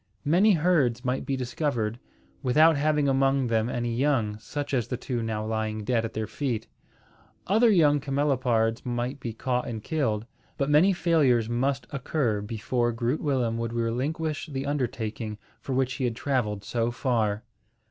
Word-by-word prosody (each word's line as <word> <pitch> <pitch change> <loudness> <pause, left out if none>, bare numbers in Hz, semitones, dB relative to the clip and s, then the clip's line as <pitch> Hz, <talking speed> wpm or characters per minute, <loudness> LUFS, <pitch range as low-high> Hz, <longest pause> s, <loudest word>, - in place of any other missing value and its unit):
Many 185 +8 +5
herds 150 -8 +2
might 130 +1 -1
be 135 - 0
discovered, 120 -3 -2 0.4
without 155 +6 +5
having 150 0 +2
among 135 0 +2
them 115 -1 +1
any 120 -1 -2
young, 120 -6 +1
such 145 +5 -5
as 120 -4 +1
the 125 - -3
two 125 -1 -3
now 110 -1 -2
lying 110 -1 -2
dead 115 +1 +1
at 115 - -4
their 110 0 -1
feet. 120 +1 -3 0.8
Other 225 +5 +4
young 150 -7 +4
camelopards 130 -5 +1
might 125 +2 -3
be 120 - -4
caught 125 +2 -2
and 110 -3 -5
killed; 115 -9 -1 0.3
but 140 +1 0
many 160 +7 +6
failures 150 - +3
must 130 +3 0
occur 130 -6 -1
before 120 +3 -1
Groot 120 +5 -1
Willem 125 -6 0
would 115 0 -3
relinquish 140 +7 -2
the 135 -3 -4
undertaking 115 -6 -3 0.2
for 135 - -4
which 130 0 +1
he 135 - -2
had 120 -2 -1
travelled 110 -7 -1
so 115 +2 -1
far. 115 -4 0
125 Hz, 160 wpm, -27 LUFS, 115-145 Hz, 0.8 s, many